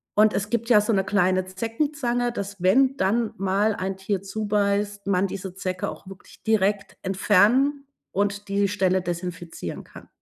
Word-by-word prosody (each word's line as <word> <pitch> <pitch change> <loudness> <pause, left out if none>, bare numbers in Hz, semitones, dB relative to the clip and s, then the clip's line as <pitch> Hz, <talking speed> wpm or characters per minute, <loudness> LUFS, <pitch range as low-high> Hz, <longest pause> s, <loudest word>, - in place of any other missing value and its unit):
und 215 +1 +5
es 205 +1 -2
gibt 235 0 -1
ja 215 -4 +7
so 215 +1 0
'ne 195 -1 +2
kleine 185 -1 +2
Zeckenzange, 240 +4 -1
dass 200 -4 -6
wenn 260 +9 +4
dann 220 +2 +1
mal 195 +3 +1
ein 190 0 -3
Tier 190 0 -2
zubeißt, 205 0 -1
man 195 0 +2
diese 190 -1 -6
Zecke 185 -1 -3
auch - - -10
wirklich 195 -1 -14
direkt 205 -2 +1
entfernen 220 +9 +3 0.3
und 205 +1 -1
die 200 0 +2
Stelle 190 -1 +1
desinfizieren 175 - -5
kann. - - -14
200 Hz, 160 wpm, -24 LUFS, 190-220 Hz, 0.3 s, ja